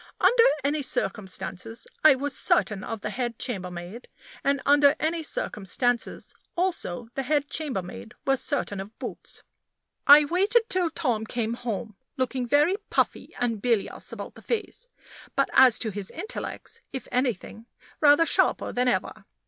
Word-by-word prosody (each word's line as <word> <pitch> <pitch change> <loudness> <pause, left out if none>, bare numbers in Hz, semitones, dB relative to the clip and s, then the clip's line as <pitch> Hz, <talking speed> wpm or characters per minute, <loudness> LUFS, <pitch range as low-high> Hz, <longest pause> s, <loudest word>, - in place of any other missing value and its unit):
Under 475 -1 +5 0.2
any 290 +2 0
circumstances, 210 -4 -4 0.2
I 310 -3 +8
was 280 +1 -2
certain 205 -4 +1
of 225 -2 -5
the 210 - -3
head 240 -2 -3
chambermaid; 180 -1 -5 0.4
and 280 0 +2
under 285 0 +6
any 325 +2 0
circumstances, 245 -3 -2 0.2
also, 330 - -2
the 270 - -2
head 290 +2 0
chambermaid 225 - -4
was 270 -1 +2
certain 255 -9 -2
of 200 +3 -8
Boots. - - -8 0.6
I 290 +1 +9
waited 395 +9 +3
till 365 -2 +1
Tom 250 -10 -1
came 230 -1 -2
home, 225 -3 -5 0.2
looking 255 -1 -1
very 295 +9 +3
puffy - - -1
and 230 -4 -1
bilious 230 -4 -1
about - - -7
the - - -14
face; 475 +1 -3 0.5
but - - +1
as 255 -3 +7
to 220 - -1
his 200 -1 -4
intellects, 440 +4 -6
if 265 -3 -6
anything, 240 -3 -2 0.3
rather 295 +2 +6
sharper - - +2
than 250 +1 0
ever. 245 - -1
250 Hz, 145 wpm, -26 LUFS, 220-295 Hz, 0.6 s, I